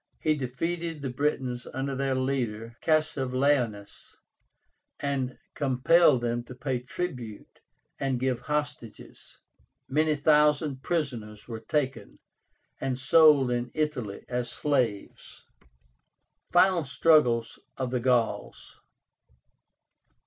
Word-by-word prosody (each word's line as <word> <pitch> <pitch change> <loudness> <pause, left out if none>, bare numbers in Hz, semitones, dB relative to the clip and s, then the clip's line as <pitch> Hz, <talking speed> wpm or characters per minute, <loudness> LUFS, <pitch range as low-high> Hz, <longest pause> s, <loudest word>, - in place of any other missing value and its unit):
He 155 -1 +1
defeated 160 +5 -3
the 135 -2 -3
Britons 130 -2 -2
under 135 +1 -2
their 135 0 -1
leader 120 -4 -2
CASSIVELAUNUS, 130 -8 0 0.8
and 135 -3 -2 0.2
compelled 135 +1 +4
them 120 0 -1
to 125 - -10
pay 130 0 -2
tribute 125 - -6 0.4
and 135 -2 -1
give 130 -1 0
hostages. 145 -6 -5 0.5
Many 155 +2 +2
thousand 150 -2 +3
prisoners 120 -11 -3
were 115 -2 -6
taken, 135 +2 -3 0.6
and 130 -2 -2
sold 145 -1 +5
in 120 0 -1
Italy 140 -10 -3
as 125 -1 -2
slaves. 125 -7 -2 1.1
FINAL 180 -1 +4
STRUGGLES 130 -4 +2 0.2
OF 130 -2 -3
THE 125 - 0
GAULS. 120 -2 -1
130 Hz, 100 wpm, -27 LUFS, 125-150 Hz, 1.1 s, sold